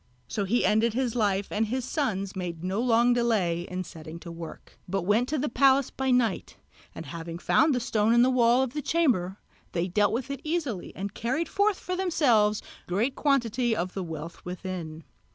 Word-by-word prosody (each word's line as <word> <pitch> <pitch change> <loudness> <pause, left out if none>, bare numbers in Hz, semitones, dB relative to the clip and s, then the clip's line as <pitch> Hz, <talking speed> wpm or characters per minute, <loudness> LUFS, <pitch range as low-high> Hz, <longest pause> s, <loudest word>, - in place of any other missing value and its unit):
So 205 - -2
he 235 +6 +2
ended 220 +1 +2
his 250 -3 0
life, 200 -4 0
and 220 +1 0
his 255 +2 -2
sons 200 - -2
made 175 -3 -5
no 190 +4 -1
long 240 0 +4
delay 195 -8 +1
in 185 0 -3
setting 160 -1 -10
to 170 - -8
work, 165 -1 -10
but 195 0 -1
went 215 +7 +2
to 305 - 0
the 295 +2 -1
palace 270 +2 +3
by 265 0 -2
night, 245 -6 +1 0.4
and 160 - -7
having 165 +3 -6
found 300 - +3
the - - +1
stone 220 -2 +1
in 240 +1 +6
the 260 - +3
wall 245 0 +4
of 260 -2 -4
the 300 - -2
chamber 240 - +1 0.4
they 175 0 0
dealt 205 +3 +2
with 260 +5 -2
it 275 -1 -5
easily 305 - -2
and 200 +1 -5
carried 265 +9 -1
forth 405 -1 +1
for 365 - -3
themselves 245 - +2 0.2
great 215 +9 0
quantity 245 -5 +1
of 180 -2 -3
the 195 - -3
wealth 165 0 -7
within. 180 -3 -6
220 Hz, 195 wpm, -27 LUFS, 185-260 Hz, 0.4 s, in